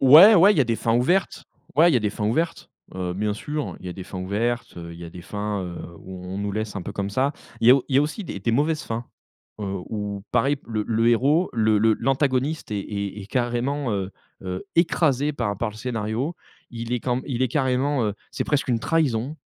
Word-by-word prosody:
Ouais, 160 Hz, +11 st, +10 dB
ouais, 195 Hz, +4 st, +7 dB
il 160 Hz, -, -1 dB
y -, -, +6 dB
a -, -, +5 dB
des 115 Hz, -1 st, 0 dB
fins 115 Hz, 0 st, +1 dB
ouvertes. 175 Hz, +9 st, +1 dB, 0.3 s
Ouais, 165 Hz, +4 st, +6 dB
il -, -, +2 dB
y -, -, +6 dB
a -, -, +2 dB
des 105 Hz, -1 st, 0 dB
fins 105 Hz, +1 st, -3 dB
ouvertes, 160 Hz, +9 st, -1 dB, 0.2 s
heu, 90 Hz, -1 st, -2 dB
bien 105 Hz, +2 st, 0 dB
sûr, 150 Hz, +6 st, -4 dB
il -, -, -9 dB
y 90 Hz, -, -6 dB
des 95 Hz, -, -7 dB
fins 95 Hz, -, -7 dB
ouvertes, 110 Hz, +3 st, -2 dB
heu, 85 Hz, 0 st, -7 dB
il 85 Hz, -, -11 dB
y -, -, -6 dB
a 85 Hz, -, -8 dB
des 90 Hz, 0 st, -10 dB
fins, 105 Hz, 0 st, -3 dB
heu, 90 Hz, -1 st, -6 dB, 0.2 s
où 95 Hz, -1 st, -9 dB
on 95 Hz, +2 st, -5 dB
nous 100 Hz, 0 st, -2 dB
laisse 110 Hz, 0 st, -3 dB
un 100 Hz, -, -3 dB
peu 100 Hz, -, -6 dB
comme 100 Hz, 0 st, -3 dB
ça. 135 Hz, +7 st, +1 dB, 0.3 s
Il 115 Hz, -, +2 dB
y -, -, +11 dB
a -, -, +10 dB
au 135 Hz, -, +1 dB
il 135 Hz, -, +2 dB
y -, -, +7 dB
a -, -, +5 dB
aussi 155 Hz, +8 st, -3 dB
des 100 Hz, -, -5 dB
des 115 Hz, -, 0 dB
mauvaises 155 Hz, +4 st, +1 dB
fins, 115 Hz, +1 st, -4 dB, 0.6 s
heu, -, -, -2 dB, 0.2 s
où 105 Hz, -2 st, -4 dB
pareil 135 Hz, +4 st, +3 dB
p -, -, -24 dB
le 110 Hz, -2 st, -1 dB
le 115 Hz, +1 st, +2 dB
héros, 140 Hz, +9 st, +3 dB
le 110 Hz, -2 st, +3 dB
le 110 Hz, 0 st, +4 dB
l'antagoniste 135 Hz, +2 st, 0 dB
est 105 Hz, -, 0 dB
est 100 Hz, 0 st, -4 dB
est -, -, -10 dB
carrément, 125 Hz, +3 st, -1 dB
heu, 95 Hz, -1 st, -2 dB, 0.3 s
heu, 90 Hz, -1 st, -4 dB
écrasé 150 Hz, -4 st, +2 dB
par 115 Hz, -8 st, -2 dB
par 115 Hz, 0 st, -2 dB
le 105 Hz, -, -13 dB
scénario. 115 Hz, +6 st, -2 dB, 0.4 s
Il 115 Hz, 0 st, -5 dB
est 125 Hz, -, 0 dB
quand 125 Hz, +1 st, 0 dB
m 130 Hz, -, -6 dB
il 130 Hz, -3 st, -1 dB
est 130 Hz, -, +2 dB
carrément, 130 Hz, 0 st, +1 dB
heu, 105 Hz, -, -2 dB, 0.2 s
c'est -, -, -2 dB
presque 145 Hz, -2 st, 0 dB
une 115 Hz, -2 st, +1 dB
trahison, 145 Hz, -3 st, 0 dB
120 Hz, 255 wpm, -24 LUFS, 105-140 Hz, 0.6 s, y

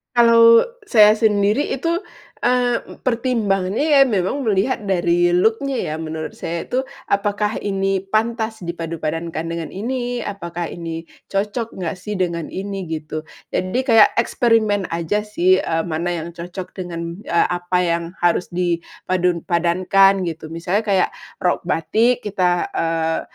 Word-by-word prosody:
Kalau 230 Hz, -1 st, +7 dB, 0.2 s
saya 215 Hz, -, +7 dB
sendiri 210 Hz, +4 st, +2 dB
itu, 335 Hz, +5 st, 0 dB, 0.4 s
eee, 245 Hz, -1 st, +2 dB
e -, -, -11 dB
pertimbangannya 225 Hz, -4 st, 0 dB, 0.2 s
ya -, -, +7 dB
memang 225 Hz, +5 st, -1 dB
melihat 210 Hz, +5 st, +1 dB
dari 175 Hz, -1 st, +2 dB
look-nya 225 Hz, +9 st, +2 dB, 0.2 s
ya -, -, -2 dB
menurut 160 Hz, 0 st, -6 dB
saya 170 Hz, 0 st, -3 dB
itu, 260 Hz, +1 st, 0 dB, 0.2 s
apakah 205 Hz, +1 st, 0 dB
ini 195 Hz, -1 st, 0 dB
pantas 220 Hz, +2 st, -2 dB
dipadupadankan 165 Hz, -1 st, -4 dB
dengan 165 Hz, 0 st, -5 dB
ini? 245 Hz, +3 st, -3 dB
Apakah 175 Hz, -5 st, -5 dB
ini 165 Hz, -1 st, -5 dB, 0.2 s
cocok 210 Hz, +4 st, -2 dB
nggak 180 Hz, 0 st, -4 dB
sih 210 Hz, +3 st, -5 dB
dengan 170 Hz, -4 st, -1 dB
ini? 195 Hz, -1 st, -5 dB
Gitu. 155 Hz, 0 st, -5 dB, 0.2 s
Jadi 185 Hz, +8 st, -1 dB
kayak 225 Hz, -5 st, +5 dB
eksperimen 225 Hz, -4 st, +2 dB
aja 205 Hz, +6 st, -1 dB
sih, 185 Hz, -2 st, +3 dB
eee, 165 Hz, 0 st, -1 dB
mana 170 Hz, +1 st, -2 dB
yang 165 Hz, -, -6 dB
cocok 175 Hz, +2 st, -7 dB
dengan, 170 Hz, -1 st, -5 dB
eee, 170 Hz, -, +3 dB
apa 175 Hz, +1 st, -1 dB
yang 170 Hz, -1 st, 0 dB, 0.2 s
harus 175 Hz, +1 st, +2 dB
dipadupadankan, 180 Hz, +2 st, +1 dB
gitu. 160 Hz, 0 st, -8 dB
Misalnya 170 Hz, +6 st, -1 dB
kayak 195 Hz, -2 st, +3 dB, 0.3 s
rok 180 Hz, -1 st, 0 dB
batik 225 Hz, +10 st, +1 dB
kita, 180 Hz, -4 st, 0 dB
eee 165 Hz, 0 st, 0 dB
185 Hz, 135 wpm, -20 LUFS, 170-220 Hz, 0.4 s, Kalau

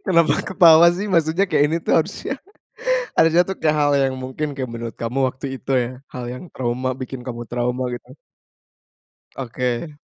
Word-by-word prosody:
Kenapa 170 Hz, -5 st, +4 dB
ketawa 170 Hz, -3 st, +6 dB
sih? 190 Hz, +4 st, -3 dB
Maksudnya 165 Hz, +2 st, +2 dB
kayak 145 Hz, -, +3 dB
ini 165 Hz, -, 0 dB
tuh -, -, 0 dB
harusnya 185 Hz, +10 st, -3 dB, 0.8 s
harusnya 165 Hz, +2 st, +5 dB
tuh 190 Hz, -, -3 dB
kayak 155 Hz, -1 st, +2 dB
hal 145 Hz, 0 st, +3 dB
yang 135 Hz, -1 st, 0 dB
mungkin 130 Hz, +4 st, -3 dB
kayak 130 Hz, -2 st, -4 dB
menurut 115 Hz, 0 st, -6 dB
kamu 115 Hz, +3 st, -2 dB
waktu 130 Hz, +2 st, -7 dB
itu 135 Hz, -, -10 dB
ya, -, -, -4 dB, 0.2 s
hal 125 Hz, -1 st, -5 dB
yang 125 Hz, -, -8 dB
trauma, 125 Hz, +1 st, -2 dB
bikin 130 Hz, 0 st, -6 dB
kamu 120 Hz, -1 st, -5 dB
trauma 125 Hz, +1 st, -1 dB
gitu. 120 Hz, -, -10 dB, 1.3 s
Oke. 125 Hz, +3 st, -3 dB
135 Hz, 165 wpm, -21 LUFS, 125-165 Hz, 1.3 s, ketawa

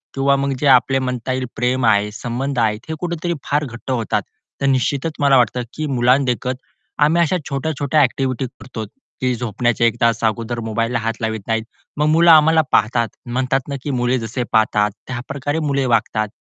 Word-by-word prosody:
किंवा 140 Hz, 0 st, +3 dB
मग 140 Hz, 0 st, -1 dB
जे 145 Hz, -, +1 dB
आपले 135 Hz, +1 st, +3 dB
म्हणता 125 Hz, -1 st, -3 dB
येईल 130 Hz, 0 st, -2 dB
प्रेम 125 Hz, +1 st, 0 dB
आहे, 105 Hz, -1 st, +3 dB
संबंध 125 Hz, +4 st, -3 dB
आहे 110 Hz, -2 st, +2 dB
हे 160 Hz, -, -2 dB
कुठेतरी 170 Hz, 0 st, -2 dB
फार 145 Hz, +1 st, 0 dB
घट्ट 120 Hz, +1 st, -7 dB
होतात. 115 Hz, -4 st, 0 dB, 0.4 s
तर -, -, +1 dB
निश्चितच 135 Hz, +3 st, 0 dB
मला 140 Hz, -2 st, +5 dB
वाटतं 125 Hz, 0 st, +2 dB
की 155 Hz, -, -3 dB
मुलांना 130 Hz, 0 st, +3 dB
देखत, 125 Hz, 0 st, -1 dB, 0.5 s
आम्ही 165 Hz, +3 st, +3 dB
अशा 170 Hz, +2 st, +2 dB
छोट्या-छोट्या 145 Hz, +1 st, 0 dB
ॲक्टिव्हिटी 130 Hz, -1 st, 0 dB
करतो, 115 Hz, -4 st, -7 dB, 0.4 s
की 130 Hz, -1 st, +1 dB
झोपण्याच्या 120 Hz, 0 st, 0 dB
1 115 Hz, -, 0 dB
तास 115 Hz, -1 st, +2 dB
अगोदर 115 Hz, +1 st, -1 dB
मोबाईलला 115 Hz, +2 st, 0 dB
हात 115 Hz, 0 st, -3 dB
लावीत 110 Hz, -1 st, -2 dB
नाहीत. 115 Hz, -1 st, 0 dB, 0.3 s
मग 150 Hz, +1 st, +2 dB
मुलं 165 Hz, +2 st, +6 dB
आम्हाला 160 Hz, +1 st, +6 dB
पाहतात, 115 Hz, +2 st, +2 dB, 0.2 s
म्हणतात 130 Hz, +2 st, -1 dB
ना 140 Hz, -, -3 dB
की 145 Hz, -, -2 dB
मुले 125 Hz, +1 st, +1 dB
जसे 115 Hz, +2 st, -3 dB
पाहतात 105 Hz, -2 st, +3 dB, 0.2 s
त्याप्रकारे 140 Hz, +4 st, -3 dB
मुले 140 Hz, -1 st, +1 dB
वागतात 110 Hz, -2 st, +1 dB
125 Hz, 180 wpm, -19 LUFS, 115-140 Hz, 0.5 s, मुलं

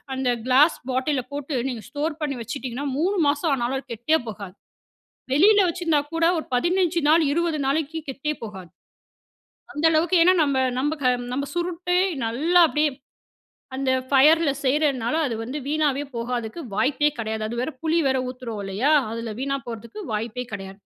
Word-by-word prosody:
அந்த 260 Hz, -1 st, 0 dB, 0.2 s
கிளாஸ் 280 Hz, +6 st, +5 dB
பாட்டில்ல 260 Hz, +1 st, 0 dB
போட்டு 285 Hz, 0 st, -4 dB
நீங்க 235 Hz, -4 st, -6 dB
ஸ்டோர் 300 Hz, +1 st, -3 dB
பண்ணி 280 Hz, -3 st, -2 dB
வச்சுட்டீங்கன்னா, 255 Hz, +3 st, -5 dB
3 380 Hz, +5 st, +1 dB
மாசம் 290 Hz, +2 st, +1 dB
ஆனாலும் 250 Hz, +1 st, -1 dB
அது 265 Hz, -, -14 dB
கெட்டே 275 Hz, +8 st, +1 dB
போகாது. 200 Hz, -3 st, -8 dB, 0.8 s
வெளில 405 Hz, +9 st, +6 dB
வச்சுருந்தா 335 Hz, -3 st, +1 dB
கூட 330 Hz, 0 st, +1 dB
ஒரு 315 Hz, -, -4 dB
15 345 Hz, +5 st, +1 dB
நாள் 325 Hz, +2 st, +5 dB
20 335 Hz, 0 st, 0 dB
நாளைக்கு 310 Hz, +3 st, -1 dB
கெட்டே 275 Hz, +3 st, -2 dB
போகாது. 190 Hz, -5 st, -8 dB, 1.0 s
அந்த 295 Hz, -, -5 dB
அளவுக்கு, 325 Hz, +3 st, +2 dB
ஏன்னா 365 Hz, +2 st, +6 dB
நம்ப 280 Hz, -2 st, 0 dB, 0.2 s
நம்பக் 295 Hz, +2 st, -2 dB, 0.3 s
நம்ப 280 Hz, +2 st, -1 dB
சுருட்டு, 355 Hz, +1 st, -1 dB, 0.3 s
நல்லா 315 Hz, +11 st, +3 dB
அப்படியே 305 Hz, 0 st, +1 dB, 0.9 s
அந்த 270 Hz, 0 st, -1 dB, 0.2 s
ஃபயர்ல 300 Hz, +3 st, +5 dB
செய்றதுனால, 270 Hz, -3 st, +1 dB
அது 235 Hz, -, -3 dB
வந்து 255 Hz, +6 st, -5 dB
வீணாவே 290 Hz, -2 st, +1 dB
போகாதுக்கு 235 Hz, +3 st, -3 dB, 0.2 s
வாய்ப்பே 275 Hz, +7 st, +2 dB
கெடையாது. 220 Hz, -1 st, -3 dB
அது 235 Hz, +2 st, -4 dB
வேற 260 Hz, -, -2 dB
புளி 325 Hz, +1 st, +1 dB
வேற 265 Hz, 0 st, +2 dB
ஊத்துறோம் 245 Hz, -4 st, -6 dB
இல்லையா? 200 Hz, +9 st, 0 dB, 0.2 s
அதுல 230 Hz, 0 st, -4 dB
வீணா 275 Hz, +1 st, -1 dB
போறதுக்கு 235 Hz, -, -8 dB
வாய்ப்பே 230 Hz, +3 st, -3 dB
கெடையாது. 195 Hz, -1 st, -7 dB
275 Hz, 150 wpm, -24 LUFS, 240-315 Hz, 1.0 s, வெளில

